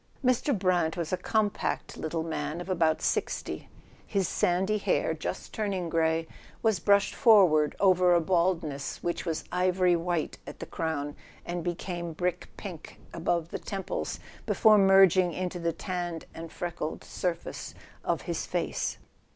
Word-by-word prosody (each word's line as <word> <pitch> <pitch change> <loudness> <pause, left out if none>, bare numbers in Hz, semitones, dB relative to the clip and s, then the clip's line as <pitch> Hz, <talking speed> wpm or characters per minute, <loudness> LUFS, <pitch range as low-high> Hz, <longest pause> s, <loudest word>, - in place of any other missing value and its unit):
Mr. 255 0 +2
Brant 180 -4 +1
was 170 0 -2
a - - +5
compact 210 +2 -1
little 160 +1 -3
man 160 0 -3
of 175 - -7
about 165 -3 +2
sixty. - - -2 0.4
His 195 -4 0
sandy 190 +4 +1
hair, - - +1
just - - -5
turning 195 -6 -2
grey, 160 0 +1 0.4
was 220 -5 +3
brushed 200 +3 +3
forward 185 - +5
over 180 -2 +5
a - - +5
baldness 170 -4 0
which 175 +1 -2
was 160 -2 -1
ivory 180 0 +3
white 170 -1 -2
at - - -8
the - - -6
crown 145 -3 -3 0.3
and 175 -1 -3
became 175 -1 -3
brick 180 +2 -2
pink 175 -6 -8
above 170 -1 -1
the - - -3
temples, 195 -2 -4 0.3
before 215 -2 +5
merg¬ 195 -2 +7
ing 180 -2 +3
into 180 0 -3
the 170 0 0
tanned 175 -2 -4
and 165 0 -8
freckled 170 -3 -4
surface 175 -2 -4 0.3
of - - -1
his - - -3
face. - - -2
175 Hz, 150 wpm, -29 LUFS, 165-190 Hz, 0.4 s, merg¬